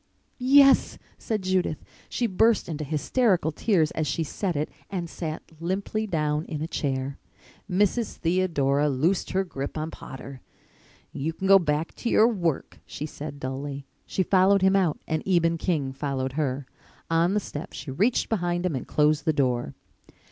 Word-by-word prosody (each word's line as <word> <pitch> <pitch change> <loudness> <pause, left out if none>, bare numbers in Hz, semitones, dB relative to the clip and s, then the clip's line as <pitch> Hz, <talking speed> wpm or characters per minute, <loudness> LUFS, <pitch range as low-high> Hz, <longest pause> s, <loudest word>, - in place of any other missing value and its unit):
"Yes," 275 +1 +5 0.2
said 215 -3 -2
Judith. 185 -4 +1 0.3
She 245 - -1
burst 225 +2 +3
into 155 -2 -4
hysterical 160 - +1
tears 165 -2 +2
as 155 -1 -2
she 150 +4 0
said 180 +3 -3
it 150 +2 -2 0.2
and 180 -3 -3
sat 160 -2 -5 0.2
limply 195 +5 -2
down 150 -4 0
in 155 - -5
a 155 - -3
chair. 135 -3 -2 0.5
Mrs. 205 +5 +1
Theodora 150 -5 +1
loosed 155 +8 +1
her 190 +1 +1
grip 140 -5 -5
on 155 +1 -3
Potter. 135 0 -9 0.7
"You 155 +4 -2
can 190 +4 -3
go 195 0 +8
back 155 -1 -1
to 235 - -2
your 220 - +5
work," 175 - -2
she 150 - -5
said 145 -1 -7
dully. 135 +1 -5 0.2
She 190 - 0
followed 190 +1 +4
him 190 +1 +5
out 180 -6 +2
and 155 -1 -1
Eben 165 -3 +2
King 150 -8 -1
followed 135 -2 -2
her. 140 -2 -1 0.5
On 170 +4 +3
the - - +3
step 150 -6 -7
she 140 0 -7
reached 210 - +1
behind 175 -4 -1
him 170 -5 0
and 130 - -5
closed 150 0 +2
the 160 - +3
door. 125 - 0
160 Hz, 165 wpm, -26 LUFS, 145-190 Hz, 0.7 s, go